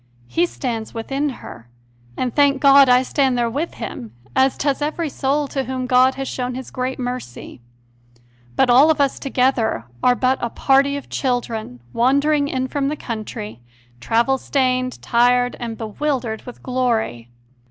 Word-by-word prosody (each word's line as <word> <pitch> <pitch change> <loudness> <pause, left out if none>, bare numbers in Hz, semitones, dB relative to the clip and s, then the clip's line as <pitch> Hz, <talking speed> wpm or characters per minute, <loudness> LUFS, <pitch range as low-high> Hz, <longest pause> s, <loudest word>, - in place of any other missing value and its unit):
He 345 +1 +1
stands 230 -8 -5
within 270 +6 -2
her, 120 - -10 0.5
and, 250 -2 -2
thank 285 -2 +4
God, 275 -1 +7
I 250 +1 +5
stand 265 -2 +1
there 235 -1 0
with 295 +7 -3
him, 120 - -7 0.2
as 265 0 +3
does 285 0 -1
every 310 +2 -2
soul 280 +2 -1
to 270 -2 -2
whom 260 -1 -3
God 255 +1 +4
has 270 0 -4
shown 250 0 -3
this 260 +1 -7
great 255 +1 -3
mercy. 245 - -6 0.9
But 250 - +3
all 270 +6 +7
of 310 -2 +2
us 280 -1 +1
together 250 - 0 0.2
are 250 - +4
but 260 +1 +1
a 240 - -1
party 275 +3 +2
of 285 - -9
children 230 - -3
wandering 280 +4 +2
in 260 -2 -2
from 275 +1 -1
the 300 +2 -2
country, 215 - -6 0.4
travel 235 - +1
stained, 255 -2 0
tired, 245 +1 +2
and 230 -2 -5
bewildered 235 0 -3
with 245 - -10
glory. 230 - -1
255 Hz, 160 wpm, -20 LUFS, 235-275 Hz, 0.9 s, God